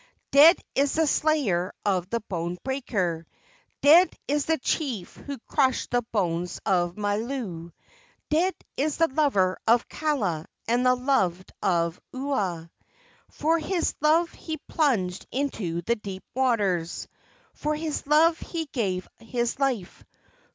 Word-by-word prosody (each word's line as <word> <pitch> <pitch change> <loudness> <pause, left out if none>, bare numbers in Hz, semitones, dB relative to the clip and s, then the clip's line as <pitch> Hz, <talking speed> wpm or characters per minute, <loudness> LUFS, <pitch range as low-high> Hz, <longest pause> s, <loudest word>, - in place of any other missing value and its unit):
Dead 310 +5 +8 0.2
is 280 0 +2
the 320 0 +3
slayer 280 - +1
of 185 -3 0
the 235 +1 -1
bone 175 -3 -4
breaker; 200 -11 -1 0.6
Dead 330 +6 +8 0.2
is 290 0 +1
the 320 0 +2
chief 255 - -2
who 280 -1 -7
crushed 265 -3 +1
the 245 0 +2
bones 175 -4 -1
of 175 -2 +1
Mailou; 205 -5 -3 0.6
Dead 350 +5 +2 0.2
is 295 +2 0
the 330 - +4
lover 260 -11 +2
of 230 +1 +4
Kaala 215 - -1 0.2
and 240 +2 +2
the 255 0 +4
loved 195 -9 0
of 170 -2 0
Ua. 200 -12 -2 0.6
For 325 +3 +1
his 345 +2 -1
love 325 +3 +3
he 315 -1 -6
plunged 205 - 0
into 210 -11 -2
the 235 +6 +1
deep 195 -3 -7
waters; 205 -10 0 0.5
For 300 +1 -2
his 305 -2 -4
love 320 +2 +4
he 330 -2 -4
gave 195 -10 -2
his 240 +2 -2
life. 250 -10 -1
245 Hz, 130 wpm, -26 LUFS, 185-295 Hz, 0.6 s, Dead